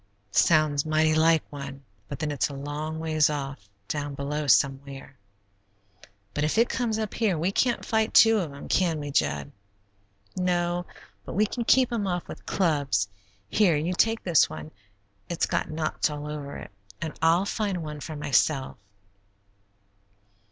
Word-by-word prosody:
"Sounds 155 - +3
mighty 155 0 +2
like 160 0 +4
one, 140 -1 -8 0.2
but 140 - -6
then 150 +1 -2
it's 145 -1 0
a 140 - -7
long 150 +3 -4
ways 155 -1 +2
off, 135 -8 -5 0.2
down 145 +1 -3
below 145 +2 -3
somewhere." 135 +1 +1 1.2
"But 150 - -1
if 155 +7 0
it 230 +1 +4
comes 230 -3 -1
up 215 -2 -3
here, 210 -7 +1
we 170 +5 0
can't 240 +4 +1
fight 220 -1 +1
two 225 -1 +7
of 165 -6 -3
'em, 140 - -9
can 170 -4 +1
we, 145 -1 -5
Jud?" 70 - 0 0.8
"No, 175 -1 0 0.4
but - - -7
we 210 +4 +3
can 235 +3 -3
keep 255 0 +4
'em 210 -4 -1
off 175 -1 -2
with - - -10
clubs. 145 - +1 0.4
Here, 185 - +3
you 165 +5 -1
take 225 +4 +1
this 170 -5 +4
one; 80 0 -8 0.6
it's 170 - 0
got - - -1
knots 155 0 -1
all 150 0 -6
over 150 -2 -6
it; - - -10 0.3
and 155 - -4
I'll 165 +4 +4
find 200 -5 -2
one 150 -1 -6
for 155 +2 -7
myself. 145 -1 +1
155 Hz, 160 wpm, -26 LUFS, 145-180 Hz, 1.2 s, two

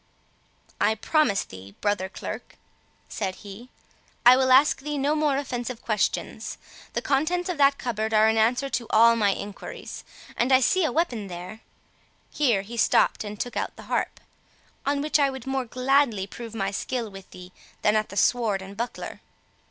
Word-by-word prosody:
"I 220 - +3
promise 220 -3 +2
thee, 95 +2 -12
brother 205 -2 0
Clerk," - - -7 0.5
said 190 -3 -3
he, 205 +5 -10 0.6
"I 245 +1 +10
will 260 0 +2
ask 270 +3 +6
thee 295 +1 -3
no 285 +2 +1
more 300 -3 +1
offensive 250 -3 -4
questions. 210 -4 -2 0.4
The - - -2
contents 345 +6 0
of 345 -4 -3
that 280 0 +5
cupboard 220 -3 -2
are 215 0 +5
an 220 - +3
answer 240 +5 +2
to 240 -4 -3
all 230 +1 +6
my 210 -3 +2
enquiries; 200 +1 -6 0.3
and 245 +3 +1
I 260 - +7
see 370 +8 +2
a - - 0
weapon 245 - -1
there" 180 +4 -8 0.7
(here 235 -10 +2
he 235 +4 -8
stooped 220 - +3
and 210 0 -7
took 245 - -4
out - - -3
the - - -11
harp) - - -1 0.7
"on 280 0 +1
which 305 0 +2
I 280 -1 +4
would 265 -3 -7
more 265 -1 -1
gladly 255 -4 +2
prove 230 +2 -9
my 195 -2 -1
skill 230 +1 -3
with 195 -1 -12
thee, 180 0 -12 0.3
than 210 - +4
at 215 0 +1
the 200 - -8
sword 215 -6 +2
and 195 +1 -10
buckler." 235 +3 -5
235 Hz, 175 wpm, -25 LUFS, 205-270 Hz, 0.7 s, I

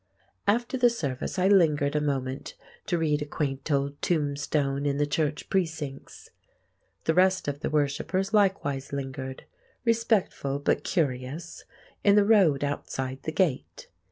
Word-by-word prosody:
After 240 +5 +1
the 245 -1 +6
service 140 - -3
I 185 +1 +3
lingered 150 -7 +4
a 150 - +2
moment 135 -2 -3 0.3
to 175 - +1
read 155 -2 +1
a - - -2
quaint 140 -1 -3
old 140 0 0
tombstone 145 -3 0
in 140 0 0
the 145 - +2
church 150 0 -1
precincts. 160 -7 -3 0.7
The 160 - +2
rest 185 0 +3
of 145 0 -2
the - - -2
worshippers 155 +7 0
likewise 165 -10 +1
lingered—respectful 140 - -2
but 145 0 0
curious—in 160 +6 -2
the 205 -1 +5
road 185 -11 +4
outside 135 -2 -3
the 155 - -3
gate. 165 -6 -1
150 Hz, 130 wpm, -27 LUFS, 140-185 Hz, 0.7 s, the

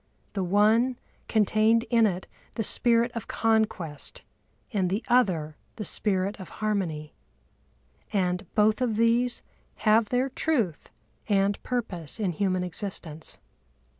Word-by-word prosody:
The 195 - -1
one 215 +7 +3 0.3
contained 220 +2 +3
in 230 -2 +5
it 185 -2 -3 0.3
the 225 - -1
spirit 235 +2 +3
of 230 - -5
conquest 220 -9 -1 0.5
and 190 -4 +1
the 200 +5 -1
other 175 -11 +2 0.2
the 215 - -5
spirit 195 +1 0
of 185 -3 -9
harmony. 180 -8 -2 1.0
And 180 -1 0
both 215 +3 +3
of 235 -4 +1
these 235 +2 +2 0.4
have 215 0 +4
their 255 +2 +1
truth 240 - -1 0.4
and 200 0 +2
purpose 215 - -3
in 200 -4 0
human 185 +1 0
existence. 175 -4 -4
210 Hz, 120 wpm, -27 LUFS, 185-230 Hz, 1.0 s, in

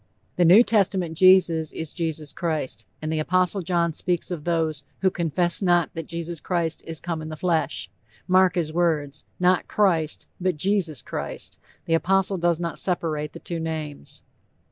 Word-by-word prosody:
The 175 - +3
New 190 +8 +8
Testament 190 -7 +1
Jesus 170 -3 +5
is 160 -2 -5
Jesus 160 -4 -3
Christ, 155 -6 -3 0.2
and 155 +1 -2
the 155 - 0
apostle 185 +4 +1
John 170 -2 0
speaks 180 +2 -1
of 160 -4 -5
those 160 -4 0 0.2
"who 190 -1 +3
confess 175 +2 +1
not 175 -3 +2
that 165 -2 -6
Jesus 170 -1 -5
Christ 170 -2 -1
is 165 -2 -5
come 165 +1 -4
in 155 - -6
the 155 - -5
flesh" 165 0 -1 0.4
mark 185 0 +4
his 160 -3 -1
words 155 -4 0 0.2
not 180 0 +3
Christ, 170 -7 +1
but 180 -3 0
Jesus 180 -5 0
Christ. - - -6 0.3
The 165 - 0
apostle 195 +3 +2
does 170 -1 +1
not 170 -1 -3
separate 155 -5 -2
the - - -9
two 170 -1 -5
names. 155 - -6
170 Hz, 165 wpm, -24 LUFS, 160-180 Hz, 0.4 s, New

